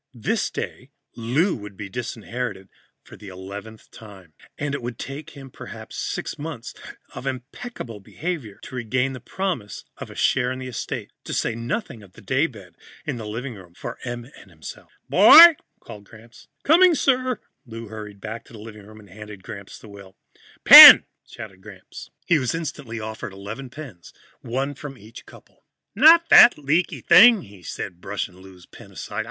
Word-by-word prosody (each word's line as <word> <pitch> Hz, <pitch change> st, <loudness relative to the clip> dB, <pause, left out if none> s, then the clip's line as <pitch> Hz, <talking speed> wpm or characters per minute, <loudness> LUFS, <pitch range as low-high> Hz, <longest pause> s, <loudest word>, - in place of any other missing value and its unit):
This 115 Hz, -, -2 dB
day, -, -, -7 dB, 0.3 s
Lou 135 Hz, -, -1 dB
would 105 Hz, -3 st, -11 dB
be 105 Hz, -, -7 dB
disinherited 110 Hz, -2 st, -6 dB, 0.3 s
for -, -, -15 dB
the 105 Hz, -, -14 dB
eleventh 100 Hz, +4 st, -11 dB
time, 95 Hz, -7 st, -15 dB, 0.2 s
and 145 Hz, -1 st, -4 dB
it 140 Hz, -, -4 dB
would 120 Hz, -1 st, -7 dB
take 145 Hz, +2 st, -9 dB
him 135 Hz, -2 st, -12 dB
perhaps -, -, -11 dB
six -, -, -5 dB
months 150 Hz, -6 st, -8 dB, 0.4 s
of 135 Hz, -, -8 dB
impeccable 130 Hz, -, -8 dB
behavior 135 Hz, -, -7 dB
to -, -, -12 dB
regain 125 Hz, +2 st, -2 dB
the 130 Hz, -, -8 dB
promise 165 Hz, -, -5 dB
of -, -, -9 dB
a -, -, -13 dB
share 125 Hz, -1 st, 0 dB
in 130 Hz, -, -5 dB
the 130 Hz, -, -8 dB
estate. 125 Hz, -, -6 dB
To -, -, -5 dB
say 115 Hz, -, -1 dB
nothing 120 Hz, -, -5 dB
of 95 Hz, -3 st, -18 dB
the -, -, -16 dB
daybed 125 Hz, -, -3 dB, 0.3 s
in -, -, -4 dB
the 110 Hz, -2 st, -8 dB
living 120 Hz, +5 st, -6 dB
room 90 Hz, -4 st, -16 dB
for 120 Hz, -, -8 dB
Em 120 Hz, -1 st, -6 dB
and -, -, -18 dB
himself. -, -, -12 dB, 0.2 s
"Boy!" 335 Hz, 0 st, +9 dB, 0.2 s
called 105 Hz, -1 st, -13 dB
Gramps. 115 Hz, +2 st, -18 dB, 0.2 s
"Coming, 345 Hz, +3 st, +5 dB
sir." 255 Hz, -4 st, 0 dB, 0.3 s
Lou 115 Hz, -1 st, -10 dB
hurried 105 Hz, -2 st, -10 dB
back 110 Hz, +3 st, -8 dB
into -, -, -18 dB
the 110 Hz, -, -12 dB
living 105 Hz, -1 st, -12 dB
room 110 Hz, 0 st, -15 dB
and 105 Hz, -, -17 dB
handed 105 Hz, -1 st, -12 dB
Gramps 100 Hz, 0 st, -10 dB
the -, -, -15 dB
will. 100 Hz, -2 st, -15 dB, 0.5 s
"Pen!" -, -, +12 dB, 0.2 s
said 95 Hz, -4 st, -12 dB
Gramps. 95 Hz, -2 st, -13 dB, 0.2 s
He 170 Hz, -, +2 dB
was 130 Hz, +2 st, -2 dB
instantly 140 Hz, -8 st, -6 dB
offered 110 Hz, -1 st, -7 dB
eleven 105 Hz, +7 st, -9 dB
pens, 125 Hz, -, -12 dB, 0.3 s
one 135 Hz, +4 st, -4 dB
from 140 Hz, -1 st, -10 dB
each 110 Hz, +2 st, -15 dB
couple. -, -, -19 dB, 0.3 s
"Not 325 Hz, +8 st, +6 dB
that -, -, +8 dB
leaky 150 Hz, +5 st, -1 dB
thing," 220 Hz, -1 st, +6 dB
he 100 Hz, -2 st, -16 dB
said, 90 Hz, 0 st, -8 dB
brushing 95 Hz, -2 st, -6 dB
Lou's 95 Hz, -1 st, -16 dB
pen -, -, -16 dB
aside. -, -, -7 dB
115 Hz, 175 wpm, -22 LUFS, 105-140 Hz, 0.5 s, Pen